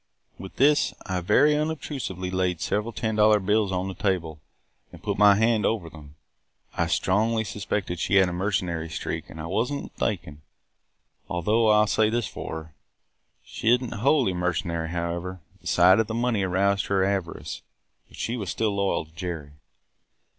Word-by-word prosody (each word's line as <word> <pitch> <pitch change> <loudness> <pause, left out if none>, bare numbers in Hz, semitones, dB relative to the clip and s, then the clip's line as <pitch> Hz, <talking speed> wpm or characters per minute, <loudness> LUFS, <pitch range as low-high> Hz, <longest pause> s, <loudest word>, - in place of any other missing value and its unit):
With 95 +1 -9
this, 145 +2 +3
I 95 -2 -2
very 145 - +4
unobtrusively 140 - -3
laid 90 -2 0
several 105 +6 -1
ten 110 0 -2
dollar 105 0 +5
bills 105 +1 +1
on 90 0 -1
the 95 - -4
table 85 -5 -2 0.5
and - - -14
put - - -1
my 105 -1 +7
hand 110 0 +2
over 90 -8 -1
them. 75 -2 -13 0.6
I - - +1
strongly 110 +4 +1
suspected 100 -4 -3
she 100 - 0
had 95 -1 +6
a 90 - -3
mercenary 90 -3 -1
streak - - -4
and 80 - -10
I 80 - -5
was 110 +10 -1
n't 140 - -3
mistaken; 75 +1 -3 0.9
though 110 +6 +2
I 105 0 +6
'll - - +4
say 110 +1 +2
this 115 -1 -1
for - - -7
her, 80 - -5
that 80 -1 -19 0.7
she 110 - -2
is 120 +1 +5
n't 125 -2 -6
wholly 120 -1 +2
mercenary, 85 -2 -2
however. 85 +2 -3 0.2
The - - -10
sight 90 +3 +5
of 110 - +1
the 110 - -4
money 120 -3 +1
aroused 100 +2 +1
her 95 -1 +2
avarice; 95 -4 -3 0.5
but - - -16
she 115 - -2
was 100 -7 -4
still 105 0 -1
loyal 100 -5 0
to 80 - -23
Jerry. 80 -4 -5
95 Hz, 180 wpm, -25 LUFS, 90-110 Hz, 0.9 s, my